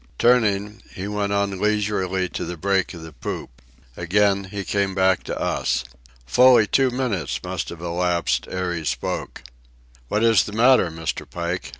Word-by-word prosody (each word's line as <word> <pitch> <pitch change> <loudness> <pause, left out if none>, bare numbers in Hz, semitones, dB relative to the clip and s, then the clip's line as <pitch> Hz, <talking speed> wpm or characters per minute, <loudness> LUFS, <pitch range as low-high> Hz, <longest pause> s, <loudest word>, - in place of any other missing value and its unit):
Turning, 105 -3 +2
he 95 +2 -5
went 105 -1 -2
on 100 -1 -1
leisurely 100 -3 0
to - - -5
the 90 - -5
break 95 +2 0
of 85 - -9
the 80 -1 -10
poop. - - -7 0.3
Again 100 +3 +1
he 100 +1 -5
came 100 -1 -1
back 95 -1 +3
to - - -4
us. - - 0 0.4
Fully 125 - +6
two 135 +5 +2
minutes 120 - -2
must - - -4
have 85 -1 -9
elapsed 85 0 0
ere 90 -1 -2
he 80 -2 -4
spoke. 75 -3 -3 0.6
"What 105 - 0
is 115 -3 +5
the 105 - -7
matter, 120 -4 +4
Mr. 80 0 -5
Pike? 85 +1 -4
100 Hz, 165 wpm, -22 LUFS, 90-105 Hz, 0.6 s, Fully